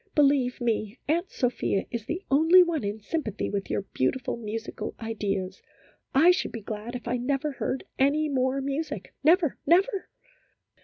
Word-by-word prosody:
Be 295 - +6
lieve 270 -3 +2
me, 225 -1 -1
Aunt 340 +5 +1
Sophia 245 -6 0
is 235 -3 -4
the 360 +4 -3
only 325 +6 +7
one 335 -7 -1
in 205 +2 -3
sympathy 220 - -3
with 200 -1 -3
your - - -1
beautiful 240 - 0
musical 225 0 -5
ideas. 200 -4 -3 0.5
I 325 +6 +7
should 360 - -1
be 230 - -6
glad 215 +3 -5
if 245 - -6
I 245 +1 0
never 275 +4 -1
heard 265 -1 -3 0.2
any 290 +3 +3
more 265 -1 0
music 280 +4 -4
never 325 -1 +4
never 380 +4 +3
260 Hz, 160 wpm, -27 LUFS, 225-310 Hz, 0.5 s, only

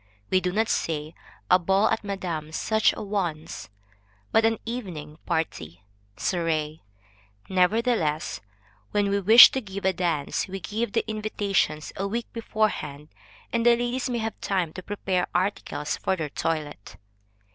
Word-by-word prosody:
We 185 - +4
do 180 - -1
not 220 +4 +1
say, 155 -4 -2 0.4
a 180 - +7
ball 195 +4 +3
at 225 - 0
Madam 175 -6 -4
such 220 +5 +2
a - - -6
one's, 175 - -3 0.6
but 225 0 +4
an 225 0 +2
evening 175 -11 -6
party 95 - -3 0.3
(soirée). 160 0 -1 0.7
Nevertheless, 190 - +1 0.5
when 205 -1 +1
we 200 - +2
wish 220 +5 +10
to 265 - -2
give 200 -2 -7
a 190 - +3
dance, 170 -5 -1
we 195 +1 -5
give 215 +3 -3
the - - 0
invitations 205 -7 -1
a 195 - -2
week 230 +4 -2
beforehand, 210 -10 -2 0.4
that 235 - +1
the 240 0 +6
ladies 245 +2 -2
may 245 - -1
have 225 -1 -4
time 180 -5 -1
to 185 - -7
prepare 190 -2 -1
articles 175 -5 -1
for 190 - 0
their 155 -4 -4
toilet. 150 -7 -3
190 Hz, 145 wpm, -26 LUFS, 160-215 Hz, 0.7 s, wish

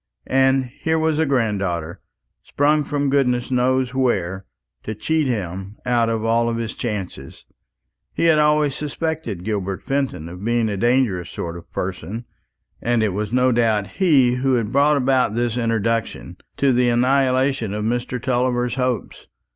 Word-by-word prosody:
And 135 0 +3
here 160 +6 -2
was 160 -1 +1
a 160 - +2
granddaughter, 100 - -1 0.4
sprung 150 +1 +1
from 145 -1 -1
goodness 125 -3 +1
knows 130 0 +1
where, 95 -8 -1 0.3
to 110 - -5
cheat 155 +7 0
him 95 -3 -4
out 120 -2 +2
of 115 -1 -1
all 115 +1 +2
his 115 -1 -3
chances. 95 - -6 0.7
He - - -2
had 165 -2 +5
always 150 -1 +3
suspected 150 - -4
Gilbert 100 -3 -3
Fenton 135 - -2
of 90 +3 -9
being 115 0 +1
a 100 - -2
dangerous 115 -6 +1
sort 85 -1 -5
of 85 - -12
person, 95 +5 -5 0.6
and 120 -1 +1
it 110 - +2
was 105 +2 -3
no 125 +1 +3
doubt 115 -4 +2 0.2
he 135 -9 +4
who 130 0 +1
had 115 -3 -1
brought 145 +2 +4
about 130 -4 +2
this 120 -1 0
introduction, 115 -1 -1 0.2
to 140 -2 +3
the 125 0 +3
annihilation 130 -1 +2
of 105 +1 -3
Mr. 120 +2 -2
Tulliver's 125 0 0
hopes. 125 -5 -3
120 Hz, 155 wpm, -21 LUFS, 105-135 Hz, 0.7 s, had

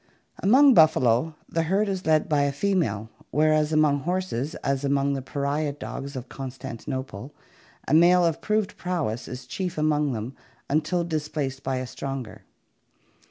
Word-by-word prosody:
Among 265 +7 +6
buffalo, 155 - +4
the 165 - -1
herd 195 +6 +1
is 190 -3 -3
led 155 +1 +3
by 150 -4 +2
a 140 0 +1
female, 140 - -1 0.2
whereas 155 +1 +2
among 155 -2 +3
horses, 175 -3 -2
as 140 0 0
among 140 0 +1
the 135 - -3
pariah 140 +2 -2
dogs 140 -1 -7
of 130 0 -6
Constantinople, 130 -1 -6 0.5
a - - 0
male 175 +2 +6
of 165 -2 0
proved 215 -1 -1
prowess 160 -11 -2
is 125 0 -7
chief 180 +8 -4
among 150 -2 +1
them 115 +4 -5 0.3
until 155 +4 0
displaced 150 -4 -3
by 135 0 -2
a 130 0 -3
stronger. 130 -4 -6
150 Hz, 150 wpm, -25 LUFS, 135-165 Hz, 0.5 s, Among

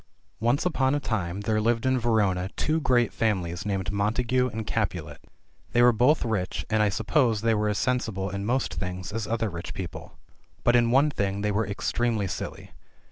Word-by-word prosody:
ONCE 120 +8 +1
upon 140 -6 +2
a - - +1
time 95 -7 -2
there 110 +1 0
lived 115 +2 +1
in 130 0 +2
Verona 100 -6 +1
two 155 +1 0
great 120 -4 +2
families 95 -5 -1
named 95 -3 -1
Montagu 120 +5 +1
and 110 0 -4
Capulet. 85 -11 -2 0.5
They 120 - +5
were 125 - +7
both 125 +7 +3
rich, 100 -5 -2
and 110 0 +3
I 105 - +3
suppose 110 +2 +1
they 115 0 +2
were 105 0 +1
as* 105 - -1
sensible, 115 -7 -1
in 100 0 -4
most 125 +5 0
things, 90 0 -5
as 110 0 -3
other 115 0 0
rich 85 0 -7
people. 90 -3 -7 0.5
But 120 - +4
in 120 -1 +4
one 140 +5 +4
thing 100 -5 -2
they 105 0 0
were 105 0 0
extremely 110 +1 -1
silly. 95 - -6
110 Hz, 190 wpm, -26 LUFS, 100-120 Hz, 0.5 s, were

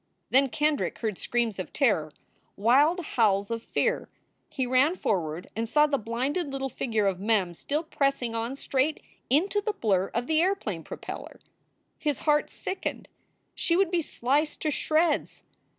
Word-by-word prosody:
Then 270 +1 +5
Kendrick 300 +2 0
heard 215 -5 -3
screams 235 -5 -1
of 180 - -5
terror, 190 - +2 0.4
wild 280 - +4
howls 205 -5 +2
of 230 0 -2
fear. 485 - -1 0.4
He 260 - -2
ran 260 +7 +3
forward 175 - -2
and 225 +1 -2
saw 300 +3 +5
the 285 -2 0
blinded 270 - -2
little 270 0 -3
figure 220 -4 -1
of 190 -2 0
Mem 200 -4 +1
still 295 - -2
pressing 275 -6 0
on 230 +3 -2
straight 275 +2 0 0.3
into 375 - +2
the 425 +1 -1
blur 195 - +1
of 235 +1 0
the 315 +2 +2
airplane 225 - -1
propeller. - - -8 0.6
His 295 -3 -1
heart 300 -1 +2
sickened. 380 - -4 0.4
She 335 -2 +1
would 390 -2 +2
be 350 -2 +2
sliced 290 +2 0
to 310 - +1
shreds. 315 +3 +1
265 Hz, 155 wpm, -27 LUFS, 220-305 Hz, 0.6 s, Then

